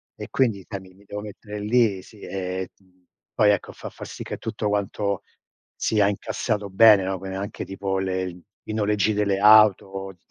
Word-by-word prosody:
E, - - -7
quindi, 110 -8 +1
sai, 100 -2 -4
mi 95 -1 -16
mi 100 +1 -21
devo 105 +1 -6
mettere 105 0 -8
lì, 105 -3 +2
sì, 105 - -16
ehm, 95 -1 -4 0.7
poi, 105 -1 +5
ecco, 100 - -1
fa - - -8
fa - - -10
sì - - -8
che - - -6
tutto 110 -1 -3
guanto 100 -1 -1 0.5
sia 105 -2 +2
incassato 105 0 -2
bene, 105 0 +7
no, 95 0 -2
quindi 95 0 -5
anche 100 +1 -5
tipo 95 0 -3
le 95 -1 -1
l 90 0 -9 0.3
i - - -2
noleggi 105 -1 +1
delle 100 -2 +1
auto, 100 -2 +5
uhm, 95 - -10
100 Hz, 185 wpm, -24 LUFS, 95-105 Hz, 0.7 s, bene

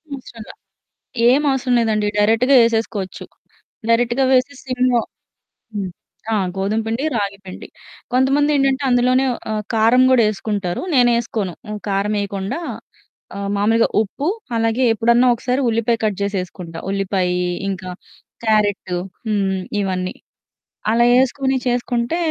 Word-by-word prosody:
అవసరంలా. 235 -4 -11 0.8
ఏం 270 +4 +4
అవసరం 260 -1 0
లేదండి. 215 -2 +1
డైరెక్ట్‌గా 225 +6 +4
ఏసేసుకోవచ్చు. 225 -4 -2 0.6
డైరెక్ట్‌గా 240 +3 +2
వేసి 260 +2 +3
సిమ్‌లో 255 -2 +1 0.7
హ్మ్. 195 -3 -3 0.4
ఆ! - - +3 0.2
గోధుమపిండి, 225 +6 -1
రాగిపిండి. 200 -2 -5 0.4
కొంతమందేంటంటే 275 +1 +2
అందులోనే 250 +1 +3 0.3
ఆహ్, 215 - -2
కారం 230 +3 +4
గూడా 255 -2 +5
ఏసుకుంటారు. 200 -4 -3
నేనేసుకోను. 235 -6 +1 0.2
ఆహ్, 210 -1 -5
కారమేయకుండా 200 +3 -2 0.8
ఆహ్, 200 0 -3
మామూలుగా 225 +3 +3
ఉప్పు, 270 +8 -5 0.3
అలాగే 225 +3 +1
ఎప్పుడన్నా 235 +3 +3
ఒకసారి 250 +3 -1
ఉల్లిపాయ 230 +1 +1
కట్ 210 -3 0
జేసి 200 0 -1
ఏసుకుంటా. 175 -2 -9
ఉల్లిపాయి, 190 -2 0 0.3
ఇంకా 185 -1 -4 0.5
క్యారెటు, 205 -4 +1 0.3
హ్మ్ 195 -3 0 0.2
ఇవన్నీ. 185 -2 -2 0.8
అలా 235 +1 +4 0.2
ఏసుకొని 265 0 0
చేసుకుంటే 245 +3 0
225 Hz, 110 wpm, -19 LUFS, 200-250 Hz, 0.8 s, గూడా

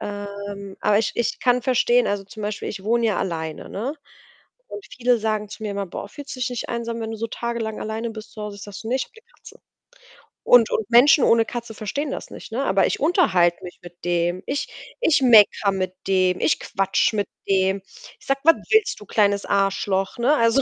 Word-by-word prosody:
Ähm, 200 -1 -7
aber 210 0 +3
ich 220 - 0
ich 235 - -1
kann 250 0 +3
verstehen 245 -1 +3
also, 200 -1 -2
zum 215 +2 -10
Beispiel 205 0 -4
ich 195 -2 -6
wohne 235 +2 +1
ja 205 -5 0
alleine, 160 -4 -4
ne, 245 +9 -4 0.7
und 410 - -8
viele 245 -1 +2
sagen 215 -1 -2
zu 220 - -9
mir 210 -2 -3
immer 200 0 -3
„Boah, 190 - -7
fühlst 285 +6 -9
dich 255 -1 -1
nicht 245 - -5
einsam, 235 -1 -3
wenn 220 - -4
du - - -5
so 230 - -2
tagelang 235 -2 -4
alleine 220 +2 -3
bist 215 -1 -10
zu 215 - -10
Hause?“ 210 -1 -6
Ich 200 - -11
sage: 205 -1 -8
„Ne 245 - 0
ich 265 - -2
habe - - -26
'ne 450 - -16
Katze.“ - - -15 0.8
Und 240 -3 +6
und 220 -1 -1
Menschen 250 +4 +6
ohne 230 0 +5
Katze 235 -1 -6
verstehen 265 +8 -4
das - - -6
nicht, - - -10
ne? 260 +4 -1
Aber 195 -6 +2
ich - - -2
unterhalte 185 - +3
mich 180 - -10
mit 175 0 -14
dem. 175 +1 0
Ich 285 +2 -2 0.3
ich 325 - +3
meckere 215 -4 +6
mit 185 -1 -3
dem, 185 -1 +2
ich - - +2
quatsche 195 +2 0
mit 200 -2 0 0.2
dem. 190 0 +2 0.4
Ich - - -20
sage: 275 0 +1
„Was 330 - +7 0.2
willst 435 - +3
du, - - -10
kleines 200 -1 +1
Arschloch?“ 195 -1 0
ne? 250 +5 +3
Also, 230 0 +3
215 Hz, 215 wpm, -22 LUFS, 195-240 Hz, 0.8 s, Was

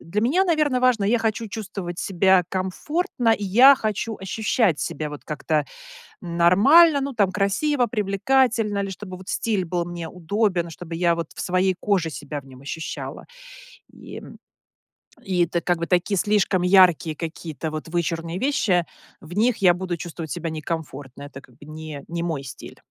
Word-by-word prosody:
для 205 +6 -2
меня, 320 +11 +3
наверно, 305 -7 +1
важно 250 -5 +3
я 230 +4 +2
хочу 225 0 -1
чувствовать 195 -4 -6
себя 190 0 +3
комфортно, 235 - -1
и 210 - -2
я 245 +9 +7
хочу 220 -1 -3
ощущать 200 - 0
себя 155 -1 -3
вот 150 - -9
как-то 150 -1 -1 0.5
нормально. 205 - +5
Ну 275 -1 -3
там 200 -4 +2
красиво, 240 +8 +1
привлекательно 220 0 +1
или 195 -1 -2
чтобы 185 -1 -8
вот 185 +1 -13
стиль 205 -5 -1
был 175 0 -2
мне 170 -1 -6
удобен, 180 -1 -1
чтобы 165 0 -8
я 170 0 +2
вот 165 -2 -4
в - - -8
своей 185 +1 +1
коже 190 -6 +1
себя 145 -1 -6
в 135 - -21
нем 130 -1 -14
ощущала. 160 +4 -6 0.7
И, - - -11
м - - -12 0.8
и 180 -3 +1
это 170 +1 -2
как 175 0 0
бы 170 - -3
такие 180 +3 +1
слишком 200 -2 +1
яркие 180 -4 +4
какие-то 160 -2 -5
вот 155 +1 -6
вычурные 170 0 -2
вещи 200 - +1 0.3
в 160 - -13
них 230 +2 +2
я 180 -3 +5
буду 180 -1 -4
чувствовать 165 -3 -7
себя 170 -2 -3
некомфортно. 150 -4 -6
Это 135 -1 -10
как 120 - -21
бы 145 - -15
не 155 -2 -8
не 170 0 -3
мой 160 -5 -3
стиль. 130 - -10
185 Hz, 170 wpm, -23 LUFS, 165-215 Hz, 0.8 s, я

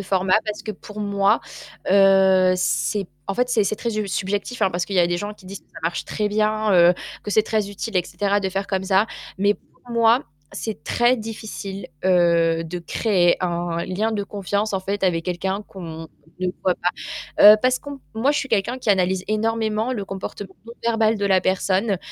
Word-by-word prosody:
format 190 -1 +1
parce 210 -1 -5
que, 215 - -5
pour 210 +1 -9
moi, 200 +1 +2 0.5
heu, 190 -1 +5
c'est 175 +3 0 0.2
en 195 - -1
fait, 250 +2 +1
c'est 230 -4 +2
c'est 200 - 0
très 235 +2 -3
sub 215 -2 -2
subjectif 200 +6 -2
hein, 190 - +3
parce 175 0 -1
qu'il 200 - -6
y 180 - +5
avait 170 - +3
des 175 - 0
gens 205 +4 -5
qui 190 - -18
disent 195 +1 -8
que - - -35
ça 165 - -11
marche 170 +1 -2
très 210 -1 -2
bien, 215 0 +1
heu, 175 -1 +6 0.3
que 210 - -4
c'est 215 - +4
très 215 -2 -1
utile 205 +1 -4
et 180 - +2
cetera, 205 +1 0
de 195 -1 -1
faire 195 +1 -3
comme 190 -1 -1
ça. 190 +2 +3 0.3
Mais 205 +1 +3
pour 245 - -21
moi, 230 +2 +4 0.3
c'est 215 -9 -5
très 240 +1 +2
difficile, 210 -4 -7 0.2
heu, 170 -2 +3
de 165 +2 -5
créer 175 0 +2
un 170 -1 -2
lien 210 +5 -1
de 205 -2 -1
confiance, 200 +1 -2
en 195 - +1
fait, 200 +2 -3
avec 170 -3 +1
quelqu'un 190 +3 -2
qu'on 165 -4 -8 0.3
ne 185 - -1 0.2
voit 185 - +2
pas. 180 - 0 0.6
Heu, - - +6
parce 255 0 +3
qu'on 285 -1 -8 0.2
moi, 235 +6 +2
je 295 - +1
suis 275 - -3
quelqu'un 230 +3 0
qui 245 - -6
analyse 185 -1 +1
énormément 220 +1 0
le 210 -5 -3
comportement 195 0 -7
non 230 - -9
verbal 225 -1 +2
de 200 - 0
la 190 -2 +4
personne 190 +2 +1
200 Hz, 210 wpm, -22 LUFS, 185-215 Hz, 0.6 s, heu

